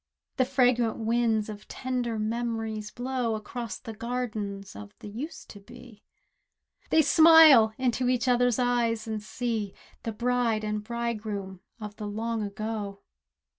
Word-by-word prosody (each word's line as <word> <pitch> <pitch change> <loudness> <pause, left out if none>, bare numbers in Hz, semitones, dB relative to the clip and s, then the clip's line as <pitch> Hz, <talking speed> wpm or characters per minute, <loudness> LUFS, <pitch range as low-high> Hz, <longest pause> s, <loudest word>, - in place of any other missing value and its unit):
The 255 - +3
fragrant 245 -3 +2
winds 225 -1 +1
of 210 -1 -9
tender 250 -3 -3
memories 220 -1 -3
blow 245 -2 -2
Across 230 +1 -6
the 225 - -7
gardens 215 -4 -4
of 210 0 -10
the - - -10
"Used 245 +11 -7
to 205 - -11
be!" 240 +1 -14 0.9
They 315 - +5
smile 300 -7 +7
into 250 -1 0
each 250 +1 +1
other's 245 -2 +3
eyes, 235 -3 +1
and 220 -1 -3
see 215 -1 -3 0.3
The 225 - -3
bride 235 -1 0
and 210 0 -2
bridegroom 215 -5 -4 0.2
of 210 -1 -8
the 210 - -5
long 225 +2 -2
ago. 205 -1 -5
230 Hz, 135 wpm, -27 LUFS, 215-245 Hz, 0.9 s, smile